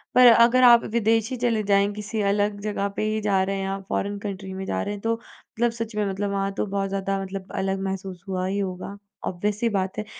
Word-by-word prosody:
पर 250 Hz, -, +8 dB
अगर 235 Hz, +2 st, +5 dB
आप 235 Hz, -1 st, +8 dB
विदेश 225 Hz, 0 st, +2 dB
ही -, -, -1 dB
चले 230 Hz, -3 st, +1 dB
जाएँ, 200 Hz, 0 st, +4 dB
किसी 210 Hz, +1 st, -4 dB
अलग 205 Hz, 0 st, 0 dB
जगह 205 Hz, -1 st, -1 dB
पे -, -, -1 dB
ही 215 Hz, -, -1 dB
जा 200 Hz, -2 st, +2 dB
रहे 195 Hz, +1 st, -1 dB
हैं 195 Hz, -, -2 dB
आप, 195 Hz, 0 st, -4 dB
फॉरेन 205 Hz, +1 st, -1 dB
कंट्री 195 Hz, -2 st, -6 dB
में 190 Hz, 0 st, -5 dB
जा 95 Hz, 0 st, -1 dB
रहे 205 Hz, -, -3 dB
हैं, 205 Hz, -, -7 dB
तो 225 Hz, +1 st, +1 dB
मतलब 230 Hz, 0 st, -4 dB
सच 230 Hz, -1 st, -5 dB
में 210 Hz, -1 st, +1 dB
मतलब 200 Hz, +1 st, -2 dB
वहाँ 195 Hz, 0 st, -1 dB
तो -, -, 0 dB
बहुत 195 Hz, 0 st, -2 dB
ज़्यादा 195 Hz, 0 st, -1 dB
मतलब 190 Hz, 0 st, -7 dB
अलग 195 Hz, 0 st, -1 dB
महसूस 190 Hz, -2 st, -5 dB
हुआ 185 Hz, -1 st, -2 dB
ही 200 Hz, +2 st, -1 dB
होगा, 190 Hz, +1 st, -4 dB, 0.3 s
ऑब्वियस 205 Hz, +3 st, -2 dB
सी 235 Hz, -, +2 dB
बात 190 Hz, -3 st, -2 dB
है। 215 Hz, -, -3 dB
200 Hz, 240 wpm, -24 LUFS, 195-215 Hz, 0.3 s, पर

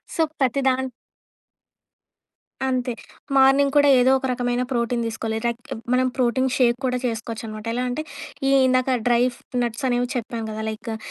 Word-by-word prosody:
So, 330 Hz, -, +1 dB, 0.2 s
ప్రతి 265 Hz, +1 st, +2 dB
దాన్ 260 Hz, 0 st, 0 dB, 1.8 s
అంతే, 250 Hz, -1 st, -1 dB, 0.4 s
morning 275 Hz, +1 st, +5 dB
కూడా 285 Hz, 0 st, +6 dB
ఏదోక 265 Hz, +1 st, +3 dB
రకమైన 245 Hz, 0 st, -1 dB
ప్రోటీన్ 235 Hz, -1 st, 0 dB
దీసుకోవాలి. 225 Hz, 0 st, -3 dB
రక్ 235 Hz, 0 st, -2 dB, 0.3 s
మనం 255 Hz, 0 st, +3 dB
ప్రోటీన్ 260 Hz, +1 st, +2 dB
షేక్ 240 Hz, -2 st, +3 dB
కూడా 250 Hz, 0 st, 0 dB
చేసుకోవచ్చనమాట. 225 Hz, -2 st, -5 dB
ఎలా 250 Hz, +1 st, -1 dB
అంటే, 305 Hz, +5 st, -3 dB, 0.4 s
ఈ -, -, +3 dB, 0.2 s
ఇందాక 255 Hz, 0 st, +2 dB
డ్రై‌ఫ్ 240 Hz, +1 st, +2 dB, 0.3 s
నట్సనేవి 245 Hz, +1 st, -1 dB
చెప్పాం 230 Hz, -1 st, -3 dB
గదా! 215 Hz, 0 st, -5 dB
లైకు 220 Hz, +1 st, -5 dB
245 Hz, 135 wpm, -23 LUFS, 235-260 Hz, 1.8 s, కూడా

